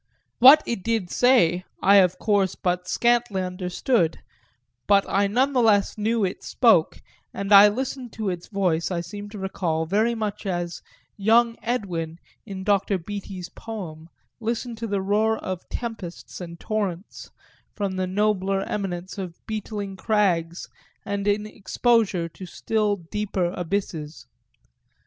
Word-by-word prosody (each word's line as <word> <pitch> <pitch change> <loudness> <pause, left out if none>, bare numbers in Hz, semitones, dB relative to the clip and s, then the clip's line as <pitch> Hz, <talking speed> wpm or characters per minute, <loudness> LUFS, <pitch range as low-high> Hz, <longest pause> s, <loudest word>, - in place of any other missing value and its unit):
What 275 +5 +9
it 235 -5 -3
did 225 -4 -1
say 205 -9 +4 0.2
I 200 +1 +6
of 185 -2 +4
course 200 -4 +1
but 180 0 -2
scantly 235 -5 +1
understood; 180 0 0 0.7
but 200 -1 +4
I 200 +1 +2
none 255 +7 +1
the 255 - +3
less 205 -3 +3
knew 220 +1 0
it 185 - -4
spoke, 220 -11 +3 0.4
and 200 +1 0
I 200 +1 +10
listened 250 +2 -3
to 215 -4 -2
its 175 -1 -7
voice, 180 -5 0
I 175 -2 -2
seem 205 +4 -8
to 210 - -9
recall, 175 -4 -2
very 215 +7 +1
much 210 -2 -4
as 175 -2 -3 0.4
"young 230 +3 +3
Edwin," 180 -9 -3 0.3
in 190 -2 -6
Dr. 200 0 +2
Beattie's 190 0 -7
poem, 170 -8 -8 0.3
listened 230 0 -3
to 230 - -3
the 200 -2 -1
roar 215 +3 +2
of 185 -2 -6
tempests 215 -8 -6
and 170 -1 -8
torrents 200 -3 -4 0.5
from 200 -2 -2
the 185 0 -1
nobler 195 0 0
eminence 190 -1 -4
of 180 -3 -5
beetling 210 -3 -5
crags 180 -5 0 0.4
and 200 0 -3
in 205 +1 +1
exposure 215 -3 +1
to 185 +3 -11
still 210 +2 0
deeper 185 0 -2
abysses. 165 -7 -4
200 Hz, 140 wpm, -24 LUFS, 180-220 Hz, 0.7 s, I